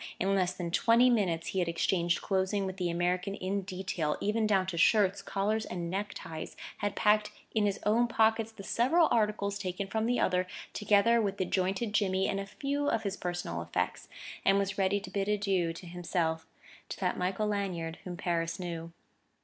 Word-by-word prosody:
In 195 +2 +1
less 185 -2 +2
than 175 -2 -5
twenty 235 +7 +5
minutes 175 -8 +1
he 190 - -1
had 175 -2 +1
exchanged 170 +1 +1
clothing 195 +1 0
with 190 0 -5
the 180 -2 -1
American 180 +3 0
in 195 +1 -2
detail, 185 -5 -2
even 215 +1 +1
down 195 -3 +3
to 185 -2 -4
shirts, 195 +2 +4
collars 210 +3 -1
and 175 -4 -4
neckties; 190 -5 -5 0.2
had 205 - -2
packed 210 0 +3 0.2
in 215 -2 +3
his 200 0 -1
own 230 +3 +3
pockets 225 -1 +2
the 220 -3 -11
several 310 - +3
articles 210 -2 +1
taken 185 +1 -3
from 220 +3 -1
the 245 +1 +1
other, 180 0 +1 0.3
together 210 +3 +4
with 200 -2 -1
the 185 - 0
jointed 190 +4 -1
jimmy 190 -2 +2
and 195 - -1
a 195 - -5
few 285 +5 -1
of 225 - 0
his 200 -2 -2
personal 175 -2 -3
effects, - - -2 0.4
and 195 0 +4
was 200 0 0
ready 195 +1 +2
to 200 - -9
bid 200 -1 -1
adieu 195 -5 +1
to 170 +2 -10
himself, 170 -2 -2 0.4
to - - -6
that 180 -2 0
Michael 190 +4 -1
Lanyard 185 -6 -2
whom 175 -1 -6
Paris 170 -1 -1
knew. 170 -2 -5
195 Hz, 190 wpm, -31 LUFS, 180-210 Hz, 0.4 s, twenty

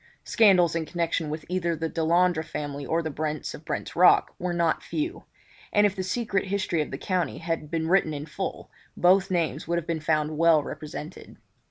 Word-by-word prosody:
Scandals 185 -7 +4
in 160 -2 -2
connection 165 -2 -1
with 155 +1 -5
either 175 -2 -1
the 165 +1 -2
Delandre 170 +1 +2
family 145 -2 -5
or 165 +1 0
the 160 - -3
Brents 155 0 -3
of - - -10
Brent's - - -4
Rock, - - +5
were 180 0 -2
not 170 -2 +1
few; 320 +3 -4 0.5
and 210 -1 +4
if 205 -1 +1
the 190 - -3
secret 195 0 -1
history 190 -4 -1
of 150 - -3
the - - -5
county 180 -7 -1
had 165 -2 -3
been 160 0 -1
written 180 -3 +3
in 145 -1 -5
full - - -5 0.3
both 185 +2 +4
names 170 -4 -1
would 170 +1 0
have 170 - -3
been 165 -1 -2
found 155 0 0
well 165 -3 +5
represented. 155 +3 -8
165 Hz, 195 wpm, -26 LUFS, 155-180 Hz, 0.5 s, Rock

